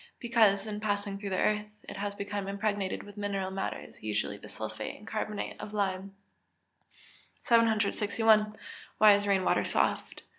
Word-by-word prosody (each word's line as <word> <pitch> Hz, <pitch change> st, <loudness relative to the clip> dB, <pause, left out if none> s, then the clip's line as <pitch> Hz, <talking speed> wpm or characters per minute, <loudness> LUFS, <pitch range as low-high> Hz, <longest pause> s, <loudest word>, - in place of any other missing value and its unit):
_ -, -, -20 dB, 0.2 s
Because, 220 Hz, -5 st, +3 dB
in 210 Hz, -1 st, -4 dB
passing 205 Hz, -1 st, -1 dB
through 200 Hz, -1 st, -4 dB
the 190 Hz, -, -1 dB
earth, 210 Hz, +1 st, +1 dB, 0.2 s
it -, -, -7 dB
has 200 Hz, 0 st, -3 dB
become 200 Hz, -1 st, -4 dB
impregnated 200 Hz, -1 st, -1 dB
with 205 Hz, 0 st, -13 dB
mineral 200 Hz, -2 st, -2 dB
matters, 195 Hz, 0 st, -5 dB
usually 105 Hz, -1 st, -1 dB
the -, -, -11 dB
sulphate 110 Hz, 0 st, -5 dB
and 210 Hz, -, -15 dB
carbonate 215 Hz, -1 st, -4 dB
of 210 Hz, -, -7 dB
lime. 195 Hz, -1 st, -2 dB, 1.3 s
761. 215 Hz, -1 st, +3 dB, 0.4 s
_Why 210 Hz, -1 st, +8 dB
is 205 Hz, 0 st, -1 dB
rain 195 Hz, -2 st, +3 dB
water -, -, +2 dB
soft? -, -, 0 dB
205 Hz, 155 wpm, -30 LUFS, 195-215 Hz, 1.3 s, Why